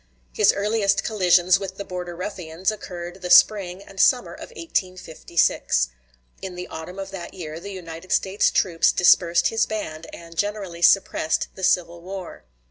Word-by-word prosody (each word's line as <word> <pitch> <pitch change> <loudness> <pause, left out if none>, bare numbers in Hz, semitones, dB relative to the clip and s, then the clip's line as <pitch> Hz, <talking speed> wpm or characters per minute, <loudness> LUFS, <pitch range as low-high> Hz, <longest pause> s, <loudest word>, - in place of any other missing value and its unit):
His - - +4
earliest 200 -1 0
collisions 185 -3 +3
with 190 -1 -7
the 200 - -6
Border 180 -1 -6
Ruffians 180 -1 -3
occurred 180 -3 -8
the 180 - -5
spring 190 0 +4
and 195 -1 -13
summer 250 +4 +3
of - - -10
1856. 185 - -1 0.5
In 185 -2 -6
the 180 0 -6
autumn 160 +4 -8
of 195 0 -6
that 185 -2 -8
year 160 -3 -7
the 200 +4 -9
United 175 -2 -9
States 195 +1 +2
troops 170 -4 +2
dispersed 175 -1 +4
his 225 - +1
band, 165 -7 -5
and 170 0 -12
generally 200 -3 -3
suppressed 170 -3 +2
the 190 - -10
civil 170 -1 +1
war. 185 0 -8
185 Hz, 155 wpm, -23 LUFS, 170-195 Hz, 0.5 s, His